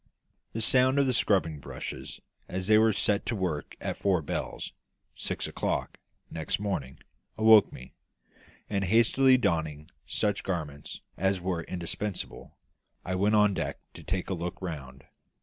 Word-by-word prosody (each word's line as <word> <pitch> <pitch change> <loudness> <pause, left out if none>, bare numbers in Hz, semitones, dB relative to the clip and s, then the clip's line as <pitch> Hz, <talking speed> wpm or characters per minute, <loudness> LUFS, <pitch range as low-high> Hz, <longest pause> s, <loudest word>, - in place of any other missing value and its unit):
The 115 - -2
sound 130 +4 +5
of 140 - +4
the 130 - +1
scrubbing 90 -9 +2
brushes, - - -7 0.3
as 95 0 -3
they 110 +2 +6
were 110 0 +5
set 105 0 +1
to 115 - 0
work 90 -7 -3
at - - -3
four 95 -5 +1
bells - - -4 0.4
(six - - -3
o'clock) - - -2 0.3
next 80 +2 -2
morning, 85 -11 -3 0.4
awoke 110 -1 +7
me; - - -11 0.7
and, 100 -1 -1
hastily 120 +6 +5
donning 80 -9 -1 0.2
such 105 -2 0
garments 75 -6 -4 0.2
as 95 +1 +1
were 90 -1 -2
indispensable, 90 +3 -5 0.5
I 90 - -2
went 100 +4 +2
on 105 -1 +5
deck - - -3 0.2
to - - -11
take 95 +1 -3
a - - +2
look 85 0 -4
round. 70 -7 -7
95 Hz, 150 wpm, -29 LUFS, 85-110 Hz, 0.7 s, awoke